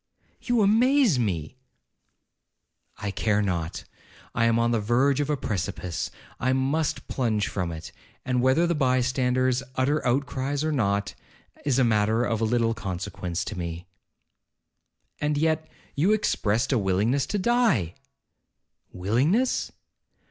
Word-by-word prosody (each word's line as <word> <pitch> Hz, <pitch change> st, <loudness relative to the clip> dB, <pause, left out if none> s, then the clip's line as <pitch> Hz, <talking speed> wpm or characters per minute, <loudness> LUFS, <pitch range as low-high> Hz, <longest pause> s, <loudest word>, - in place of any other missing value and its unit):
'You 240 Hz, -3 st, +2 dB
amaze 230 Hz, -, +4 dB
me!' 95 Hz, -2 st, -2 dB, 1.4 s
'I 100 Hz, -, -3 dB
care 105 Hz, +1 st, +1 dB
not—I 90 Hz, +5 st, -4 dB
am 115 Hz, 0 st, +3 dB
on 115 Hz, 0 st, +2 dB
the 115 Hz, -, +2 dB
verge 125 Hz, +6 st, +2 dB
of 145 Hz, 0 st, -1 dB
a 150 Hz, -, +1 dB
precipice—I 95 Hz, -, -3 dB
must 140 Hz, +4 st, -1 dB
plunge 110 Hz, -5 st, 0 dB
from 90 Hz, -4 st, -3 dB
it—and 125 Hz, +9 st, -5 dB
whether 130 Hz, +7 st, +3 dB
the 170 Hz, -, +1 dB
by 130 Hz, -4 st, +2 dB
standers 130 Hz, 0 st, +1 dB
utter 145 Hz, +4 st, +1 dB
outcries 135 Hz, +2 st, -1 dB
or 155 Hz, -, 0 dB
not, 100 Hz, -7 st, 0 dB, 0.5 s
is 135 Hz, -3 st, +2 dB
a 130 Hz, -, +4 dB
matter 110 Hz, 0 st, +2 dB
of 115 Hz, -2 st, -1 dB
little 115 Hz, 0 st, +2 dB
consequence 90 Hz, -4 st, -4 dB
to 110 Hz, -, -5 dB
me.' 85 Hz, -1 st, -5 dB, 1.3 s
'And 150 Hz, 0 st, 0 dB
yet, 160 Hz, +1 st, 0 dB, 0.3 s
you 175 Hz, +9 st, +3 dB
expressed 120 Hz, -, 0 dB
a 125 Hz, -, +3 dB
willingness 105 Hz, +8 st, +1 dB
to 205 Hz, -, -1 dB
die?' 205 Hz, -, +2 dB, 1.0 s
'Willingness! 135 Hz, -, +1 dB
125 Hz, 125 wpm, -26 LUFS, 105-145 Hz, 1.4 s, amaze